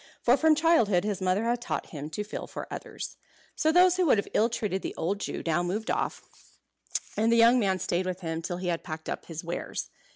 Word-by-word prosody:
For 245 - +6
from 315 +1 +4
childhood 295 - +3
his 205 -2 -2
mother 185 +3 +1
had 235 +1 0
taught - - -4
him 150 -1 -6
to 210 +7 -3
feel 210 - -6
for - - -6
others. - - -7 0.4
So 315 - +2
those 360 +1 +5
who 365 -2 +3
would 260 - +5
have 200 - -1
ill 225 +2 +3
treated 205 -5 -2
the - - -5
old 195 +5 -1
Jew - - -4
now 165 +1 +2
moved 195 +5 -2
off, - - -2 0.9
and 225 +2 +2
the - - +5
young 235 +2 +6
man 195 -4 +2
stayed 185 0 -1
with 185 0 -3
him 165 -1 -3
till 175 +1 -3
he 180 0 -3
had 170 -1 -1
packed 160 0 -6
up - - -4
his 165 0 -6
wares. 170 +1 -4
200 Hz, 230 wpm, -28 LUFS, 175-235 Hz, 0.9 s, For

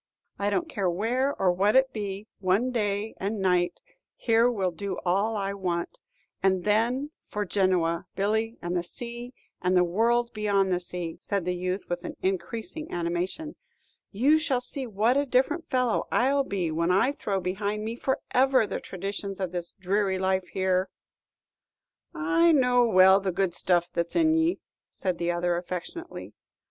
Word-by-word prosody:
"I 200 0 +1
don't 330 - 0
care 200 - -1
where 240 +10 0
or 185 -2 +4
what 200 +5 +2
it 265 0 +4
be; 205 -1 -4
one 200 +7 +1
day 210 -2 -1
and 205 +2 -3
night 180 -2 +1 0.3
here 230 +1 +3
will 195 -6 -1
do 195 +4 -4
all 200 +5 +1
I 195 0 -2
want. 180 -3 -3 0.4
And 190 -2 +2
then 240 +7 +1 0.2
for 210 0 -2
Genoa, 180 -4 +1
Billy, 220 +4 0
and 175 +1 -2
the 175 - +1
sea, 240 +6 -6 0.3
and 180 0 +2
the 180 - +5
world 235 +7 +1
beyond 200 -3 +1
the 175 - +1
sea," 175 -2 -4
said 200 -4 -2
the 180 - 0
youth, 185 +2 -3
with 175 0 -3 0.2
increasing 220 - -3
animation. 175 - -3 0.5
"You 275 +10 +3
shall 280 -5 0
see 255 +1 -5
what 225 +4 +2
a 285 - +2
different 295 +7 +1
fellow 250 -4 +1
I'll 275 +3 +3
be 180 -7 -2
when 170 +2 0
I 195 +9 +3
throw 200 -8 -2
behind 200 +3 -2
me 225 +1 -3
forever 260 -1 +2
the - - -4
traditions 195 +1 -5
of 185 -3 -2
this 175 -1 -4
dreary 195 +1 0
life 190 -1 0
here." 185 0 0 1.3
"I 335 0 +3
know 250 -3 +4
well 190 -2 +6
the 195 -1 -1
good 185 0 0
stuff 175 0 +1
that's 170 0 -2
in 320 -1 +4
ye," 325 +2 +1 0.3
said 185 -3 -3
the 170 0 -1
other, 175 0 0
affectionately. 185 - -6
200 Hz, 165 wpm, -27 LUFS, 180-245 Hz, 1.3 s, well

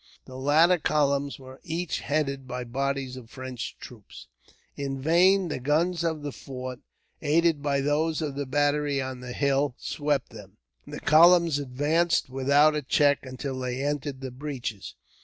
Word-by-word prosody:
The 130 - -11
latter 155 +7 +4
columns 140 -2 +1
were 130 0 -13
each 165 +1 -3
headed 140 -3 -2
by 125 0 -4
bodies 135 +1 -2
of 125 -3 -11
French 130 -2 -7
troops. 110 -5 -12 0.5
In 135 -1 -4
vain 180 +6 +4
the 150 - -3
guns 165 +6 +1
of 160 -3 -2
the 145 - -4
fort, 130 -2 -7 0.4
aided 160 0 +2
by 140 -1 0
those 150 +3 0
of 150 -3 -3
the 140 0 -4
battery 145 0 +1
on 130 -1 -4
the 125 0 -7
hill, 140 -1 +1
swept 145 -1 -2
them. - - -13 0.3
The - - -7
columns 170 -1 +5
advanced 145 +3 0
without 140 +3 +4
a 150 - -1
check 145 +1 +2
until 130 +1 -5
they 125 +1 -3
entered 145 -2 -3
the 130 -1 -5
breaches. 125 -6 -6
140 Hz, 160 wpm, -26 LUFS, 130-150 Hz, 0.5 s, columns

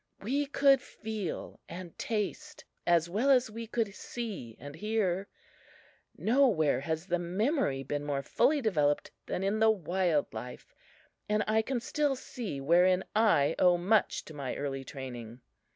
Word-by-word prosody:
We 280 +7 -1
could 275 -1 +4
feel 215 -4 -6
and 175 0 -8
taste 270 +5 -3 0.2
as 170 -1 +4
well 215 +10 0
as 255 -4 +4
we 230 +1 -6
could 220 -3 -1
see 205 - -6
and 145 0 -8
hear. 200 -2 -1 0.9
Nowhere 215 - +3
has 160 +4 -3
the 175 -2 0
memory 185 - 0
been 145 +2 -3
more 140 -1 -2
fully 295 - +2
developed 150 - +1 0.2
than 185 - -2
in 200 +3 0
the 220 0 +5
wild 180 -5 +1
life, 125 0 -8 0.6
and 210 0 +2
I 220 +1 +3
can 250 +2 -2
still 285 +3 0
see 230 - -6
wherein 180 +6 +4
I 205 -10 +4
owe 180 -1 +5
much 200 +4 +1
to 155 - -10
my 140 -3 -4
early 135 -1 -3
training. 125 -3 -8
190 Hz, 150 wpm, -30 LUFS, 150-225 Hz, 0.9 s, the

